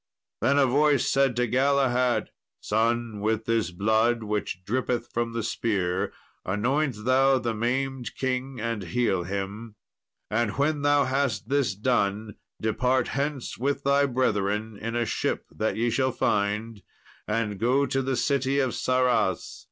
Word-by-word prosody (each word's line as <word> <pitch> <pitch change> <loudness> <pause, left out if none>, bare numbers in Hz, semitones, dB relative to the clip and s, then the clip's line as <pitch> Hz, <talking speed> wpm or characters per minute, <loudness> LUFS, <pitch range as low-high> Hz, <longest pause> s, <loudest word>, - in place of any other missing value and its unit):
Then 140 - +3
a 140 - +5
voice 145 +1 +3
said 135 -3 +2
to 125 0 +2
Galahad, 125 -1 +2 0.3
"Son, 115 0 0
with 110 +1 -1
this 115 -6 +1
blood 110 +5 +1
which 105 -3 -3
drippeth 120 +1 -1
from 115 0 -1
the 115 -1 -2
spear 95 -5 -1 0.3
anoint 120 +3 -1
thou 135 +1 +4
the 120 -2 -2
maimed 125 +2 -2
king 130 0 -2
and 115 -1 -2
heal 95 -1 0
him. 100 +4 -5 0.6
And 110 0 0
when 145 +1 +1
thou 145 0 +4
hast 130 -5 -1
this 135 -7 +1
done, 105 -1 0 0.3
depart 125 +4 +1
hence 140 -4 -3
with 140 +2 -1
thy 140 +1 +3
brethren 110 -4 0
in 115 +3 -5
a 120 0 +1
ship - - -2
that 110 - -1
ye 115 +1 0
shall 130 +1 +1
find, 105 0 -1 0.5
and 105 -2 -1
go 130 +5 +2
to 135 -1 0
the 135 0 -1
city 135 +2 +1
of 130 -3 +2
Sarras. 125 -6 0
120 Hz, 145 wpm, -26 LUFS, 110-135 Hz, 0.6 s, a